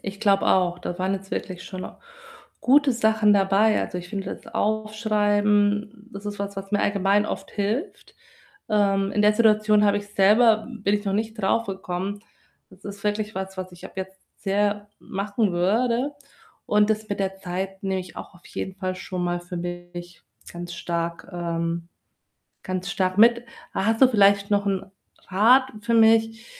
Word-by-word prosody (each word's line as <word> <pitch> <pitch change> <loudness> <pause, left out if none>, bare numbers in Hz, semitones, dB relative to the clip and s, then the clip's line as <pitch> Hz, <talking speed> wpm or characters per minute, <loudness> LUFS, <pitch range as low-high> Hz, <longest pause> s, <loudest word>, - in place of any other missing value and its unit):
Ich 200 +1 -7
glaube 200 -2 +3
auch, 180 -2 +2
da 175 - -5
waren 185 +1 0
jetzt 195 0 -5
wirklich 185 -1 -5
schon 185 -1 -6 0.7
gute 280 +1 +4
Sachen 220 -2 +3
dabei. 200 +2 +3
Also, 180 - -4
ich 180 0 -9
finde 195 +1 -4
das - - -17
Aufschreiben, 210 0 +1
das 200 +1 -9
ist 205 0 -5
was, 200 0 -5
was 195 0 -7
mir 205 - +2
allgemein 200 +1 +2
oft - - -5
hilft. 220 - -3 0.5
Ähm, 195 -2 +2
in 210 - +1
der 210 0 +5
Situation 215 -1 +4
habe 205 0 +3
ich 205 - -9
selber 215 +3 +4
bin 205 -4 -1
ich 205 0 -2
noch 195 - -1
nicht 220 +2 -1
drauf 220 +2 0
gekommen. 190 +1 -4 0.5
Das 190 0 -19
ist 200 0 -8
wirklich 210 +1 -1
was, 190 0 -5
was 185 -1 -6
ich 175 - -13
ab - - -9
jetzt 190 0 -6 0.2
sehr 205 +1 0
machen 200 +1 -2
würde 235 +10 +1 0.5
und 210 0 +3
das 215 0 -1
mit 200 -1 -3
der 195 0 -2
Zeit 190 +1 -5
nehme 190 -1 -1
ich 180 -1 -11
auch - - -9
auf 175 - -20
jeden 190 - -5
Fall 185 -1 -3
schon 185 -1 -5
mal 175 0 -1
für 175 +1 -8
mich 175 0 -7 0.3
ganz 175 0 -7
stark, 170 0 -4
ähm 170 -1 -3 0.8
ganz 185 -1 -3
stark 185 0 -1
mit. 235 +2 +5 0.3
Ha 190 - -1
hast 225 +2 +1
du 265 - +9
vielleicht 200 -2 +4
noch 200 0 +2
‘n 195 -1 -1 0.4
Rat 250 +7 +4
für 235 +2 -1
mich, 225 0 +4
200 Hz, 175 wpm, -24 LUFS, 185-215 Hz, 0.8 s, du